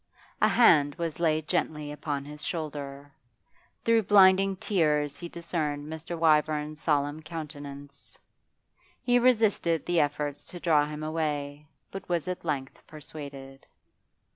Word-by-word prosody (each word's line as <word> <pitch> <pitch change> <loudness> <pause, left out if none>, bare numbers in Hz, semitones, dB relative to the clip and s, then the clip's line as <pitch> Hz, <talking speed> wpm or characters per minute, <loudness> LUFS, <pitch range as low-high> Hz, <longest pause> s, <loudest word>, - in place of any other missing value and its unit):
A - - +6
hand 145 -11 +5
was 165 -2 -4
laid 155 -2 +1
gently 150 -1 -1
upon 145 -1 -4
his 150 +1 -10
shoulder. 145 -3 -5 0.7
Through 230 0 +4
blinding 195 -1 +6
tears 150 -7 0
he 170 - -7
discerned 155 -4 -3
Mr. 160 +2 -6
Wyvern's 155 -1 +2
solemn 145 0 0
countenance. 145 -3 -9 0.9
He 245 -1 +4
resisted 220 -9 +2
the 175 -1 +2
efforts 145 -1 -1
to 175 - -9
draw 150 -4 +3
him 150 0 -6
away, 150 -2 -3 0.2
but 195 0 -8
was 175 -1 -1
at 180 0 -4
length 140 -5 -3
persuaded. 140 -3 -10
155 Hz, 125 wpm, -28 LUFS, 145-170 Hz, 0.9 s, A